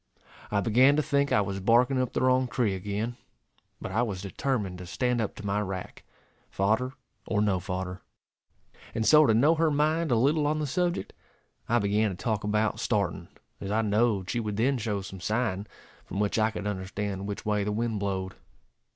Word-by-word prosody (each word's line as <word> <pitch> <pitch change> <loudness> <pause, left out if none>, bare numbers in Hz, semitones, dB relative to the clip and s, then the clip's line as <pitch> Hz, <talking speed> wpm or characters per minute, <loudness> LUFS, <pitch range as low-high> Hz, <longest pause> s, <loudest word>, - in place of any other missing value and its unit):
I 100 -1 +1
began 125 +6 +5
to 155 - +2
think 140 0 +1
I - - +4
was 100 -1 -3
barking 125 +6 +3
up 125 - -2
the - - 0
wrong 130 0 +3
tree 120 -5 0
again; 105 +5 -3 0.6
but - - -6
I 110 +5 +1
was 105 -6 -2
determined 100 -3 -2
to 90 - -8
stand 125 +4 0
up 105 - -3
to 105 - -9
my 100 +1 0
rack, 95 -2 -6 0.5
fodder 110 +7 0 0.3
or 105 - 0
no 100 -3 +2
fodder. 90 0 -4 0.9
And 110 - 0
so, 150 +2 +7
to 110 - +4
know 145 +8 +5
her 165 0 +2
mind 155 +2 +1
a 120 - +3
little 145 +6 +2
on 155 +1 +1
the 155 - -1
subject, 175 +5 -1 0.6
I 120 - +4
began 105 0 +2
to 90 - -6
talk 110 -1 -1
about 105 +1 0
starting, - - -1 0.3
as 100 - -5
I 110 +2 +1
knowed 105 -2 +1
she 120 - -1
would 105 -3 -3
then 130 +3 +2
show 105 -3 -2
some 95 -1 -9
sign, 105 -1 -1 0.4
from 100 - -5
which 105 +2 +1
I 110 0 +3
could 110 -2 -6
understand 100 0 -3
which 100 - -5
way 105 -1 +1
the 105 - -1
wind 110 0 -1
blowed. 95 -1 -2
110 Hz, 195 wpm, -28 LUFS, 100-125 Hz, 0.9 s, so